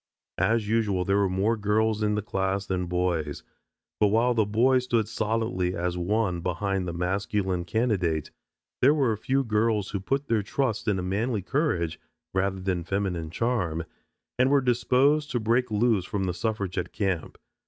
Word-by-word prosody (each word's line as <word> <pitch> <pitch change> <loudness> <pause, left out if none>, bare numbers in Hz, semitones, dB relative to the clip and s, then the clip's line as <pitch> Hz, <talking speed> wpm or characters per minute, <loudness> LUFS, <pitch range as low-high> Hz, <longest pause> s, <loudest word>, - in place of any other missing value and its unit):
As 115 -2 +2
usual 105 -5 +1
there 100 +2 +2
were 100 -1 +2
more 100 +5 +1
girls 110 +1 +1
in 105 0 +1
the 105 - -2
class 95 -1 -1
than 90 -2 -2
boys, 85 -4 -1 0.6
but 105 - +5
while 115 +4 +3
the 110 -3 +2
boys 125 +4 +3
stood 115 -4 +1
solidly 110 -4 -1
as 90 +1 -1
one 90 0 0
behind 90 +2 -1
the - - -2
masculine 95 +1 -1
candidate, 95 -9 0 0.5
there 140 +4 +6
were 135 -6 +2
a - - 0
few 135 +4 +1
girls 105 -2 0
who 100 - -2
put 135 +9 -1
their 115 -5 +1
trust 110 +1 -2
in 95 -3 0
manly 105 +2 -1
courage 90 - -1 0.3
rather 95 0 0
than 90 -2 -1
feminine 90 -3 -2
charm 90 -5 -1 0.6
and 130 +1 +4
were 140 0 +5
disposed 130 +4 +2
to 125 - -1
break 120 +3 +1
loose 110 -2 +2
from 100 0 -2
the 90 -1 -1
suffragette 100 -3 -2
camp. 95 -6 -2
105 Hz, 165 wpm, -26 LUFS, 90-115 Hz, 0.6 s, there